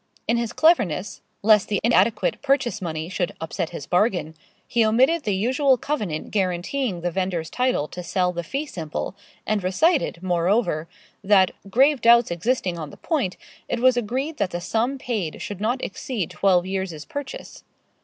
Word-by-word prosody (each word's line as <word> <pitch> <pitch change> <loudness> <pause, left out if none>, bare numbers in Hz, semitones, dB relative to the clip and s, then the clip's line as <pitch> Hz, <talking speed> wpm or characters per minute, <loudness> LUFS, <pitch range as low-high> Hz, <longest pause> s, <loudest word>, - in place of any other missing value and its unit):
In 235 - +2
his 235 -1 -2
cleverness 210 - +2 0.2
lest 210 -1 +5
the 205 -3 0
inadequate 215 -1 +2
purchase 270 -5 +1
money 160 -2 -3
should 185 -1 -2
upset 160 +1 -3
his 160 -5 -7
bargain 180 -4 +1 0.3
he 235 -1 +2
omitted 260 +10 +3
the 205 -3 +1
usual 255 +6 +2
covenant 210 - -3
guaranteeing 190 +2 -1
the 175 +1 -1
vendor's 180 -3 -2
title 250 - 0
to 180 - -7
sell 180 +1 0
the 175 - -3
fee 275 - -3
simple, 165 - -5 0.3
and 215 -3 0
recited, 190 - +1
moreover, 175 -2 +1 0.4
that, 190 -2 +5 0.2
grave 270 +5 +4
doubts 235 -3 +5
existing 180 -1 -1
on 155 -2 -5
the - - -13
point, 275 - -1 0.3
it - - -1
was 255 0 +5
agreed 260 +7 -2
that 200 -5 0
the 175 - -4
sum 230 +9 -1
paid 215 -11 -3
should 205 -1 -6
not 245 +4 0
exceed 200 -2 -4
twelve 185 -3 +2
years' 190 -5 -4
purchase. 285 -2 -7
205 Hz, 165 wpm, -23 LUFS, 175-250 Hz, 0.4 s, lest